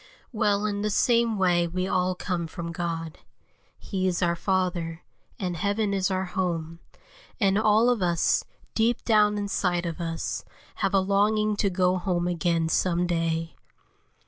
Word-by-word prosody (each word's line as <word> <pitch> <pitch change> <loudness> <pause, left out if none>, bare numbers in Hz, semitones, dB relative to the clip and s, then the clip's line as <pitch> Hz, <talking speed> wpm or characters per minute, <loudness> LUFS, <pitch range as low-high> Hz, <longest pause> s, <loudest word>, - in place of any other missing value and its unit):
Well, 210 -3 +1
in 205 -1 -1
the 210 - 0
same 230 +1 +2
way 175 -2 +2
we 185 +2 -2
all 185 -1 +1
come 180 -2 -3
from 170 +1 -6
God; 165 -1 -4 0.6
He 190 -2 -2
is 180 0 0
our 170 0 +2
Father, 175 -3 -1 0.3
and 180 -3 -3
heaven 205 +3 0
is 190 -1 +1
our 190 0 -1
home, 170 -3 -3 0.6
and 195 -3 +3
all 215 +2 +4
of 245 -4 +2
us, 170 -2 +2 0.3
deep 230 +2 +1
down 210 -2 +4
inside 180 -3 -1
of 170 +1 -4
us, 165 -1 -3 0.3
have 195 0 0
a - - +6
longing 210 +2 +2
to 200 - +2
go 185 0 +2
home 175 -2 -1
again 170 -2 0
some 175 +1 +1
day. 165 -1 -1
185 Hz, 155 wpm, -26 LUFS, 170-205 Hz, 0.6 s, a